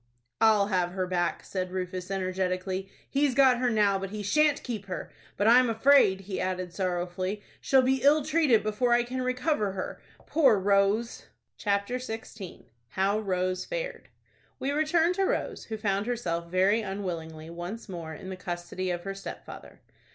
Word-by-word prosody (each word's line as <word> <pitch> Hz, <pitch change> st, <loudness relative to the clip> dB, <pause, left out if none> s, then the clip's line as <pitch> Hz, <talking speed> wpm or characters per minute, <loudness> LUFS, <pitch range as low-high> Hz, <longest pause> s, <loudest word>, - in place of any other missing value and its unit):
"I'll 210 Hz, -2 st, +5 dB
have 180 Hz, -2 st, 0 dB
her 185 Hz, -1 st, -1 dB
back," 175 Hz, -1 st, -1 dB
said 185 Hz, -1 st, -3 dB
Rufus, 185 Hz, 0 st, -4 dB
energetically. 185 Hz, 0 st, -2 dB, 0.2 s
"He's 280 Hz, -2 st, +1 dB
got 260 Hz, -3 st, +5 dB
her 250 Hz, -1 st, +2 dB
now; 205 Hz, -3 st, +2 dB
but 195 Hz, 0 st, -4 dB
he 210 Hz, +1 st, -5 dB
shan't 300 Hz, +7 st, +2 dB
keep 215 Hz, -5 st, -5 dB
her. 185 Hz, -, -5 dB, 0.3 s
But 205 Hz, -, +2 dB
I'm 245 Hz, +1 st, +6 dB
afraid," 225 Hz, -4 st, +5 dB
he 195 Hz, 0 st, -4 dB
added, 185 Hz, -1 st, -3 dB
sorrowfully, 185 Hz, +2 st, -2 dB, 0.2 s
"she'll 265 Hz, -1 st, +4 dB
be 265 Hz, 0 st, +2 dB
ill 290 Hz, +2 st, +4 dB
treated 300 Hz, -8 st, +3 dB
before 215 Hz, +3 st, +1 dB
I 240 Hz, 0 st, +4 dB
can 255 Hz, +2 st, -4 dB
recover 255 Hz, -4 st, 0 dB
her, 185 Hz, -, -5 dB, 0.2 s
poor 270 Hz, -9 st, +4 dB
Rose!" 200 Hz, +4 st, +1 dB, 0.3 s
CHAPTER 200 Hz, +3 st, -1 dB
XVI. 220 Hz, -5 st, -8 dB, 0.3 s
HOW 195 Hz, +2 st, +1 dB
ROSE 185 Hz, -2 st, -1 dB
FARED. -, -, -5 dB, 0.5 s
We 270 Hz, -, -2 dB
return 320 Hz, +3 st, +2 dB
to 390 Hz, +1 st, 0 dB
Rose, -, -, -2 dB
who 220 Hz, -, -5 dB
found 205 Hz, 0 st, -1 dB
herself 170 Hz, -9 st, -2 dB
very 190 Hz, +5 st, +3 dB
unwillingly 170 Hz, -6 st, -5 dB
once 175 Hz, +7 st, -6 dB
more 165 Hz, -4 st, -6 dB
in 190 Hz, -, -9 dB
the -, -, -4 dB
custody 180 Hz, +1 st, -4 dB
of 175 Hz, -1 st, -2 dB
her 195 Hz, -, -4 dB
stepfather. 195 Hz, -, -10 dB
200 Hz, 165 wpm, -28 LUFS, 185-245 Hz, 0.5 s, I'm